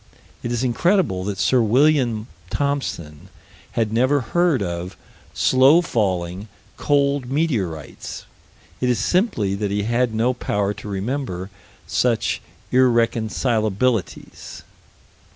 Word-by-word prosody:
It 120 - -4
is 120 +1 -1
incredible 130 - +1
that 100 -1 -3
Sir 125 +5 +3
William 120 -1 +2 0.2
Thomson 95 - -3 0.4
had 110 -2 0
never 130 +5 +2
heard 160 - +1
of 85 +1 -5 0.4
slow 135 +6 +5
falling, 95 - -1 0.3
cold 140 -3 +1
meteorites. 110 - -3 0.5
It 125 - 0
is 120 - +2
simply 115 - +1
that 100 0 -2
he 100 +1 -1
had 120 +1 0
no 120 +3 +2
power 105 -4 -1
to 105 - -10
remember 100 -2 -3 0.3
such 120 -3 0 0.3
irreconcilabilities. 115 -3 0
115 Hz, 105 wpm, -21 LUFS, 100-130 Hz, 0.5 s, slow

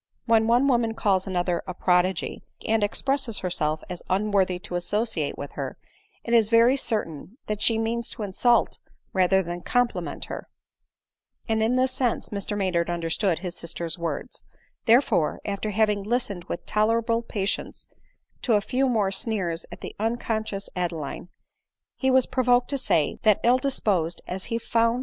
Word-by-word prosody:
When 225 -1 +4
one 245 +4 +4
woman 235 -4 +2
calls 195 -4 +1
another 175 -2 0
a 185 - -5
prodigy, 180 0 +1 0.2
and 220 -1 +2
expresses 265 +2 0
herself 155 -3 -1
as 180 -1 -6
unworthy 190 -1 +2
to 180 - -9
associate 175 -2 -1
with 140 - -6
her, 135 -2 -5 0.5
it 235 - -2
is 225 -3 +5
very 230 +3 +5
cer 230 -5 0
tain 165 - -11
that 210 -1 -3
she' 225 - +3
means 230 +1 -1
to 225 - -6
insult 235 +5 +2 0.3
rather 190 0 +3
than 175 0 -5
compliment 245 +3 -1
her; - - -7 1.0
and 220 -1 +1
in 225 +3 +2
this 255 0 +2
sense 255 -3 -1
Mr 205 0 -3
Maynard 180 -4 0
understood 170 +1 0
his 180 -1 -4
sister's 170 0 -4
words; 170 - -4 0.4
therefore, 225 - +3
after 200 +1 -2
having 210 0 +2
listened 205 -4 -2
with - - -5
tolerable 230 +2 +1
patience 200 -4 -3 0.6
to 235 - +2
a - - +5
few 255 +6 0
more 210 -5 +1
sneers 190 -5 -1
at - - -10
the - - -7
unconscious 220 -2 -2
Adeline, 170 -2 -3 0.7
he 265 - 0
was 260 -1 +4
provoked 245 0 +2
to 280 - 0
say, 160 - +1
that 215 -2 +4
ill 245 +2 +5
disposed 190 -11 0
as 185 +1 -3
he 230 - -2
found 230 0 -1
ADELINE 230 0 +4
MOWBRAY. 245 - -3
210 Hz, 165 wpm, -25 LUFS, 180-235 Hz, 1.0 s, is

